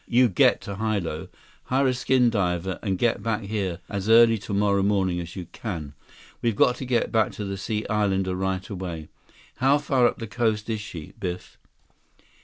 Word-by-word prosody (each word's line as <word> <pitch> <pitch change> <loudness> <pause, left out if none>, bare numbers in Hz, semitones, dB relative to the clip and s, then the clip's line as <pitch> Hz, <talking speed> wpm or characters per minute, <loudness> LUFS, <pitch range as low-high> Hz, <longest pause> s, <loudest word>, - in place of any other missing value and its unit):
You 125 +1 +4
get 95 - +4
to 100 -1 -6
Hilo. 100 -8 -2 0.4
Hire 130 +1 +2
a - - +1
skin 125 -1 +3
diver 90 -3 -1
and 95 -4 -1
get 120 +4 +1
back 110 -1 -1
here 100 -4 -2
as 100 +1 -3
early 115 0 +6
tomorrow 100 0 +1
morning 95 -3 +1
as 85 -1 -7
you 90 -3 -5
can. 80 -11 -6 0.5
We've 115 -3 +1
got 125 - +4
to 130 - -5
get 125 -2 0
back 110 -1 +2
to 105 - -5
the 100 0 -3
Sea 105 +2 -3
Islander 95 -3 0
right 95 0 -2
away. 90 -5 -6 0.5
How 135 +3 +4
far 135 -4 +3
up - - -2
the 115 - -5
coast 110 0 -1
is 110 -1 -2
she, 85 -7 -8
Biff?" 90 -3 -5
100 Hz, 185 wpm, -25 LUFS, 95-115 Hz, 0.5 s, early